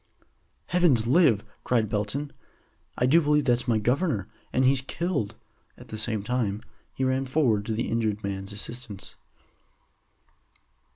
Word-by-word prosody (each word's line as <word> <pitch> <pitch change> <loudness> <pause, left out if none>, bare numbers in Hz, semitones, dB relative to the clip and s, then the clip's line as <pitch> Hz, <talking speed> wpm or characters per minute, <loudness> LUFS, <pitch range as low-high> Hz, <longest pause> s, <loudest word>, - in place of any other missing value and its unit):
"Heavens 170 -11 +3
live!" 125 - +4 0.2
cried 115 -3 +2
Belton. 105 +8 -2 0.6
"I 125 - +2
do 160 +7 +5
believe 150 -1 +2
that's 120 -2 +2
my 115 -2 +3
governor, 120 - 0 0.2
and 130 - +2
he's 130 0 +4
killed." 140 - -2 0.4
At - - -14
the 110 - -5
same 110 -2 -1
time 110 -3 -1 0.3
he 130 - -3
ran 130 +1 +1
forward 125 -7 +1
to 110 - -1
the 115 +2 -1
injured 110 -2 -1
man's 95 0 -4
assistance. 105 0 -7
120 Hz, 135 wpm, -27 LUFS, 105-135 Hz, 0.6 s, do